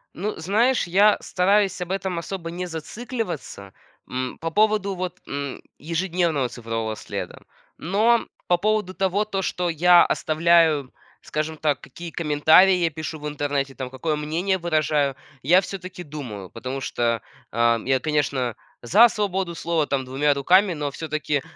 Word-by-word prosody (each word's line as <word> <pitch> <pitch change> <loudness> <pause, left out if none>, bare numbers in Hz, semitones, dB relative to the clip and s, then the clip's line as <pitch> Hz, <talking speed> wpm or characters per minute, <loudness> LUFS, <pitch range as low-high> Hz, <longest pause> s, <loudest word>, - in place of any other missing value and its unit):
Ну, 205 +5 -3
знаешь, 215 +7 +2
я 205 +4 +5
стараюсь 195 +1 +2
об 180 - -4
этом 190 -2 -2
особо 170 -1 -6
не 180 +1 -4
зацикливаться, 175 - -6 0.4
м, 130 0 -3
по 165 0 -2
поводу 210 0 +2
вот, 180 -1 -5
м, 140 -1 -5 0.2
ежедневного 165 -3 0
цифрового 115 -2 -4
следа, - - -6 0.4
но 220 +7 +2 0.2
по 175 - +3
поводу 210 -1 0
того, 195 +2 0
то 195 -2 -2
что 180 -2 -1
я 175 +2 +6
оставляю, 160 -3 +2 0.3
скажем 155 +1 -3
так, 150 -3 0
какие 170 +5 -9
комментарии 160 +4 +5
я 170 -2 +1
пишу 155 0 -6
в 150 - -5
интернете, 145 -2 -2
там 130 -1 -5
какое 150 +4 -2
мнение 165 +6 -1
выражаю, 155 -5 +1 0.3
я 175 +7 +6
всё-таки 185 -2 -7
думаю. 125 - -7
Потому 130 +3 -5
что, 115 -2 0 0.3
ам, 115 0 +2
я, 135 -1 +3
конечно, 140 -5 -1 0.3
за 215 - +6
свободу 190 -5 -2
слова, 165 -3 0
там, 135 -2 -1
2 140 +3 +1
руками, 180 +7 +4
но 150 -1 -4
всё-таки, 150 -1 -2
165 Hz, 150 wpm, -23 LUFS, 140-185 Hz, 0.4 s, я